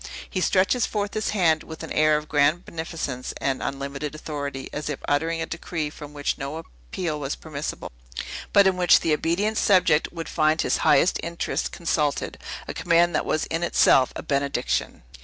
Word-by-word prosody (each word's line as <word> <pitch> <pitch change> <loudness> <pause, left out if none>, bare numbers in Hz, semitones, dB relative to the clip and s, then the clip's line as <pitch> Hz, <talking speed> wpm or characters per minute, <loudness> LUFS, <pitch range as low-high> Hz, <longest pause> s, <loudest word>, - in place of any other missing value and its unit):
He 185 - -3
stretches 195 +7 +2
forth 205 -1 -2
his 215 - -1
hand 165 -6 +3
with 160 -1 -9
an - - -7
air 155 0 +4
of 150 0 -6
grand 150 +4 +2
beneficence 160 -6 -5
and 135 -1 -1
unlimited 140 +2 -4
authority, 140 -3 -5
as 150 +1 -4
if 145 - -2
uttering 165 +3 0
a - - -2
decree 160 -2 -4
from 150 -1 -10
which 145 +1 -2
no 140 +3 -4
appeal 150 - -5
was 140 -1 -3
permissible, 150 -2 -6 0.6
but 200 - +6
in 190 -1 +3
which 180 -1 +5
the 160 - +2
obedient 190 +8 0
subject 180 -6 +3
would 165 -1 -6
find 155 0 +2
his - - +1
highest 180 - +4
interests 170 +1 -2
consulted; 150 -4 -1 0.3
a - - -4
command 170 +1 +3
that - - 0
was 155 - 0
in 165 +1 -2
itself 135 -6 +4
a - - -5
benediction. 140 - -1
155 Hz, 175 wpm, -24 LUFS, 145-170 Hz, 0.6 s, but